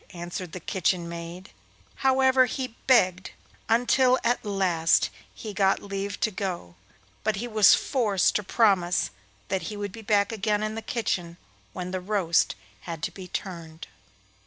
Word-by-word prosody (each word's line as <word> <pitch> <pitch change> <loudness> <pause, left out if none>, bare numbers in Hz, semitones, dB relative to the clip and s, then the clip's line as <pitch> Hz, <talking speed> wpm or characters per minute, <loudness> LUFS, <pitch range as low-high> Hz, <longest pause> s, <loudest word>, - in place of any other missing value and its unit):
answered 175 0 -6
the 185 - -6
kitchen 175 0 -1
maid. 170 +2 -8 0.5
However, 265 -1 +4
he 255 -1 -4
begged 185 -7 +3 0.4
until 250 +2 +4
at 240 +1 +1
last 185 -6 +2 0.2
he 215 -2 -8
got 195 0 +2
leave 200 0 -4
to 215 - +2
go, 185 - -4 0.5
but 220 -1 +1
he 230 +5 -4
was 215 -3 +6
forced 215 -8 +1
to - - -3
promise 185 - +2 0.4
that 190 - 0
he 210 - -6
would 205 -1 -4
be 225 - -10
back 205 -1 +2
again 210 -1 0
in 215 0 -2
the 225 - -5
kitchen 180 -7 -2 0.4
when 180 -1 -5
the 185 -1 -3
roast 185 -4 +1 0.2
had 165 -3 -7
to - - -1
be 185 -2 -10
turned. 170 -4 -6
195 Hz, 155 wpm, -26 LUFS, 180-220 Hz, 0.5 s, was